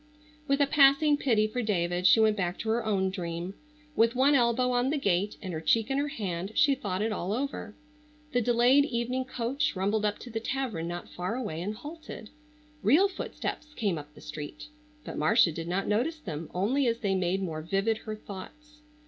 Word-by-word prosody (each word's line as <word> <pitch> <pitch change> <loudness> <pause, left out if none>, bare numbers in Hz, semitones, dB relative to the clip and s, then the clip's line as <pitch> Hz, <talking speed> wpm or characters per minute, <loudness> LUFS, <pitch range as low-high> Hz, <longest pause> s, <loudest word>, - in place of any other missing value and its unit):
With 275 0 +2
a - - +6
passing 280 +1 +5
pity 230 -7 +2
for 230 +3 -2
David 180 -4 +1
she - - +6
went 220 -1 +4
back 180 -3 -2
to 225 - -4
her 230 +1 +1
own 195 -3 +1
dream. 175 -1 -4 0.4
With 230 +2 +3
one 270 +3 +4
elbow 250 -1 +3
on 245 +1 +1
the 300 - 0
gate 200 -5 0
and 185 -2 -4
her 160 - -4
cheek 225 +9 +2
in 270 - +1
her 290 - 0
hand 195 - -4
she 285 -2 +5
thought 200 -7 -2
it 225 - 0
all 190 -2 -3
over. 250 -4 -4 0.6
The 245 - +2
delayed 245 +4 +4
evening 255 0 -2
coach 255 +1 -1
rumbled 205 +3 0
up 210 -1 0
to 245 - -9
the 225 - -2
tavern 230 -9 -3
not 175 0 -5
far 180 +6 -3
away 210 -11 -4
and 205 +4 -3
halted. 295 -3 -9 0.5
Real 310 - +5
footsteps 305 -5 -6
came 200 -8 0
up 150 0 -13
the - - -14
street, 150 - -8 0.4
but - - -5
Marcia 155 +3 +4
did 165 +1 -6
not 185 +3 -1
notice 245 +11 0
them 165 - -6
only 245 +9 +1
as 230 0 0
they 200 -3 +1
made 185 +1 0
more 160 -4 -3
vivid 195 +6 0
her 215 -1 -6
thoughts. 300 +10 -11
220 Hz, 200 wpm, -29 LUFS, 185-260 Hz, 0.6 s, a